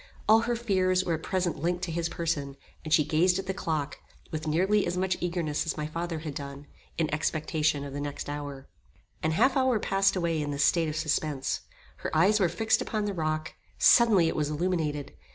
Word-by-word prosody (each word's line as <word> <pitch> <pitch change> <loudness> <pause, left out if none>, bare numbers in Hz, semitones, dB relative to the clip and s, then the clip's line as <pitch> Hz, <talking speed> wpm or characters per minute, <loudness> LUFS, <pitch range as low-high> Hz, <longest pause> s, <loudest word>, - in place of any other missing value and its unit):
All 220 +1 +7
her 240 - +2
fears 185 -5 +1
were 170 - 0
at 160 - -2
present 180 -3 -1
linked 175 +2 -1
to 180 - -2
his 165 0 -1
person, 145 -5 -3 0.3
and 155 - -7
she 155 -1 +5
gazed 170 +5 +2
at 195 - -4
the 190 - -2
clock, 155 -6 -3 0.3
with 155 0 -4
nearly 190 +7 +2
as 180 - -2
much 185 0 +1
eagerness 170 -4 -1
as 160 - -2
my 150 - -2
father 165 +2 -3
had 155 -2 -5
done, 140 0 -7 0.3
in 155 -2 0
expectation 155 -1 0
of 140 -1 -7
the 145 - -4
next 145 0 -5
hour. 145 -2 -6 0.5
An 160 - +1
half 255 - +3
hour 260 -4 +3
passed 195 -1 +2
away 170 -3 0
in 145 - -3
this 145 0 0
state 165 -2 +2
of 150 - -4
suspence. 155 -3 -1 0.4
Her - - -4
eyes 200 +6 +4
were 185 -4 +3
fixed 220 +6 +1
upon 215 -2 -2
the 205 - -2
rock; 155 -2 -2 0.2
suddenly 215 -8 +6
it - - -1
was 150 -1 0
illuminated. 150 -3 -2
165 Hz, 205 wpm, -28 LUFS, 150-185 Hz, 0.5 s, All